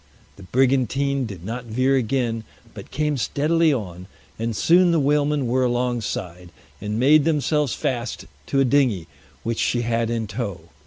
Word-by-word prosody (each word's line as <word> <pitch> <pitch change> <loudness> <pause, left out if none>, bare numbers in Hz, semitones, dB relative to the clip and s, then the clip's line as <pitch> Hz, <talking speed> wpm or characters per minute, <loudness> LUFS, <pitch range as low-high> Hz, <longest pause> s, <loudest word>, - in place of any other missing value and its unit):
The - - -15
brigantine 135 +4 +1
did 95 -5 -9
not 120 +4 -5
veer 130 +4 +1
again, 120 -2 0 0.3
but - - -10
came 150 -1 -1
steadily 155 +6 +2
on, 90 -8 -4 0.3
and 115 0 -2
soon 175 - +4
the 165 -1 +3
whalemen 145 0 +1
were 130 +2 +1
alongside, 120 -7 -2 0.3
and 105 +1 -3
made 145 +4 +5
themselves 150 -2 +1
fast 125 -5 -3 0.2
to 135 - +1
a 135 - +4
dinghy 125 - +2 0.4
which 115 0 -2
she 120 -1 +1
had 115 -1 0
in 115 -1 -1
tow. 100 -4 -5
125 Hz, 155 wpm, -22 LUFS, 115-140 Hz, 0.4 s, made